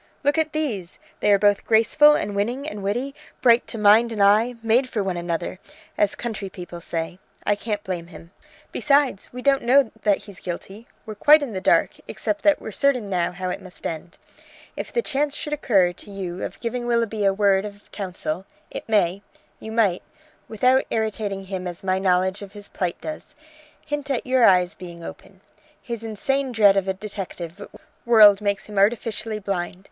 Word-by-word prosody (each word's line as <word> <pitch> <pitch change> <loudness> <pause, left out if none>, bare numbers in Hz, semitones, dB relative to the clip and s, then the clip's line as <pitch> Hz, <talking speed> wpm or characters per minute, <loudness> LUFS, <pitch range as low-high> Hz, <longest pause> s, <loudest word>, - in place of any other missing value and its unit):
Look 290 +3 +2
at 315 -1 0
these! 230 - -3 0.2
They 210 - +2
are 200 - +6
both 205 0 +3
graceful 230 +7 +5
and 205 -7 -2
winning 240 +8 -2
and 210 -1 -6
witty, 240 +8 -2 0.3
bright 235 -1 +5
to 230 - -6
mind 215 +3 +5
and 220 - -5
eye, 220 +5 +4
made 240 +4 +2
for 215 -5 -1
one 190 -2 -2
another, 175 +1 -3 0.4
as 205 -1 +1
country 215 -5 -5
people 175 -2 -9
say. 165 +2 -4 0.3
I 205 - +3
can't 205 0 -4
blame 175 -3 -4
him. 170 -1 -13 0.4
Besides, 280 -7 +1
we 250 0 -8
don't 275 -1 +3
know 255 0 +4
that 205 -2 +3
he's 200 -3 -11
guilty. 195 +5 -7 0.2
We're 215 - -6
quite 295 +8 +6
in 250 -6 -5
the 185 - -4
dark, - - +2
except 310 - -2
that 300 -1 +4
we're - - -7
certain 250 -8 +1
how 180 0 -1
it - - -5
must 185 -2 -13
end. 165 +1 -5 0.6
If - - -6
the 475 - 0
chance 285 +1 -1
should 300 - -4
occur 195 -11 +2
to 180 - -11
you 190 -2 -5
of - - -6
giving 240 +1 -3
Willoughby 230 -3 0
a 195 - +4
word 195 -1 +2
of 205 -1 -10
counsel 185 -2 -4 0.2
it - - -7
may 195 -3 +2 0.4
you 220 - -8
might, 210 -6 +2 0.5
without 255 +4 +3
irritating 215 -3 -2
him 185 -1 -5
as 175 0 -7
my 190 0 +1
knowledge 185 +1 +1
of 200 -1 -10
his 205 -1 -6
plight 180 -2 -3
does, 310 -1 -7 0.5
hint 295 -2 -4
at 265 -4 -1
your 255 -2 +4
eyes 180 -3 +4
being 170 -2 -10
open. - - -11 0.4
His 235 -2 -6
insane 265 +5 -1
dread 210 -4 +5
of 195 -1 0
a 190 - +1
detective 195 -2 -7 0.4
world 215 -4 +7
makes 200 -1 -1
him 205 -2 -3
artificially 220 +1 0
blind. 190 -3 -3
205 Hz, 185 wpm, -23 LUFS, 190-240 Hz, 0.6 s, world